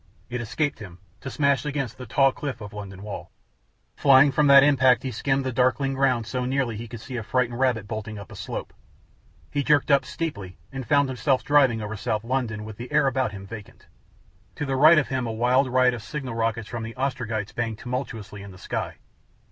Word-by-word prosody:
It 125 0 -2
escaped 135 +4 -2
him, 95 -5 -10 0.2
to 130 - -6
smash 140 -1 +1
against 145 -6 -3
the 125 - -8
tall 135 +4 +4
cliff 140 -2 -5
of 105 -2 -9
London 100 -2 -8
wall. 105 -1 -7 0.7
Flying 140 0 +6
from 145 +2 +3
that 140 -1 +9
impact 130 -3 +4
he 130 - -3
skimmed 135 +3 0
the 130 - -1
darkling 130 +2 +1
ground 130 -4 +1
so 125 +2 -3
nearly 130 -2 -1
he 115 +2 -6
could 115 -1 -9
see 125 +1 -6
a - - -2
frightened 120 +1 -1
rabbit 120 -6 +1
bolting 110 -1 -5
up 100 -2 -10
a - - -9
slope. - - -6 0.8
He 145 - 0
jerked 150 0 +3
up 140 -1 +5
steeply, 130 - -5
and 135 -3 -6
found 145 +1 +3
himself 130 +1 0
driving 135 -7 +3
over 105 +1 -5
south 105 +1 -2
London 115 -3 -2
with 110 -1 -9
the 120 +1 -8
air 150 -1 +3
about 130 -4 0
him 100 -1 -9
vacant. 105 0 -11 0.7
To 145 - -3
the 135 -1 -1
right 155 +5 +7
of 155 - +2
him 130 -2 -1
a - - -2
wild 125 +4 +2
riot 130 0 +4
of 120 - -6
signal 130 +4 -5
rockets 115 -1 -1
from 120 0 -5
the 115 +1 -7
Ostrogites 115 -5 -3
banged 115 -2 -2
tumultuously 115 -5 -5
in 100 - -9
the 95 - -12
sky. - - -4
125 Hz, 210 wpm, -25 LUFS, 110-135 Hz, 0.8 s, that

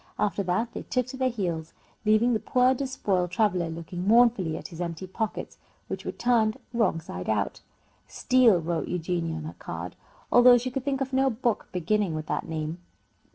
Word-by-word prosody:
After 205 -1 0
that 200 +6 -1
they - - -5
took 250 -1 -1
to 260 - -7
their 260 0 +2
heels, 170 -8 -3 0.3
leaving 215 +3 +4
the 220 - +1
poor 255 +3 +3
despoiled 210 -9 -1
traveller 180 -3 +1
looking 170 +3 -5
mournfully 220 -8 +4
at - - -8
his 170 -1 -8
empty 170 +1 -4
pockets, 215 +3 -4 0.3
which - - -5
were - - -2
turned 235 -1 +2 0.2
wrong 220 -8 +2
side 90 - -7
out. 105 -2 -1 0.5
"Steal" 245 -7 +4
wrote 165 0 -2
Eugenia 170 -1 -2
on 160 - -5
her 155 - -7
card, - - -6 0.4
although 245 0 +8
she 250 +2 -3
could 265 0 -3
think 275 -1 -1
of 265 0 -2
no 265 +1 +3
book 235 -1 -1
beginning 185 0 0
with 155 0 -4
that - - -3
name. 160 +1 -3
205 Hz, 185 wpm, -27 LUFS, 170-245 Hz, 0.5 s, although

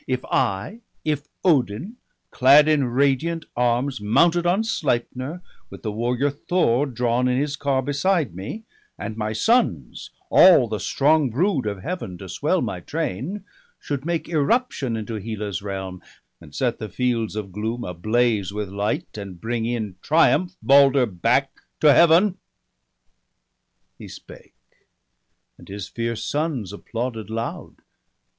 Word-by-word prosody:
If 130 -1 -2
I, 100 - -1 0.3
if 150 -2 -1 0.2
Odin, 155 - +1 0.3
clad 140 +4 +6
in 150 -3 +3
radiant 140 +6 0
arms, 125 +1 0
Mounted 170 +11 +3
on 190 +5 +2
Sleipner, 150 - -2 0.3
with - - -12
the 110 - -2
warrior 120 +6 0
Thor 145 -3 +1
Drawn 125 0 0
in 125 0 +1
his 145 +1 -1
car 140 -2 0
beside 145 - 0
me, 100 - -7 0.3
and 110 - -5
my 110 -1 -2
sons, 115 - 0 0.2
All - - +7
the - - -3
strong 150 -1 +2
brood 140 - 0
of 100 -3 -4
Heaven, 135 - -5
to 95 - -9
swell 90 - 0
my - - -3
train, 155 - -4 0.4
Should 140 -2 -4
make 170 0 -2
irruption 150 - 0
into 110 0 -5
Hela's 105 -3 -4
realm, 95 -2 -6 0.4
And 75 - -14
set 125 -2 -1
the 110 -2 -5
fields 115 -1 -1
of 105 -3 -5
gloom 110 +5 -3
ablaze 105 +3 0
with 105 -1 -4
light, 100 +2 -3
And 95 -3 -8
bring 115 +1 -2
in 110 -6 -3
triumph 175 +3 +3
Balder 140 -1 +5
back 90 -6 +1 0.3
to 150 -2 +6
Heaven?' 170 +5 +5 1.6
He - - -9
spake, - - -13 1.0
and - - -15
his 100 0 -6
fierce 115 -1 -4
sons 145 - -2
applauded 115 0 -5
loud. 115 +1 -6
125 Hz, 135 wpm, -23 LUFS, 105-150 Hz, 1.6 s, All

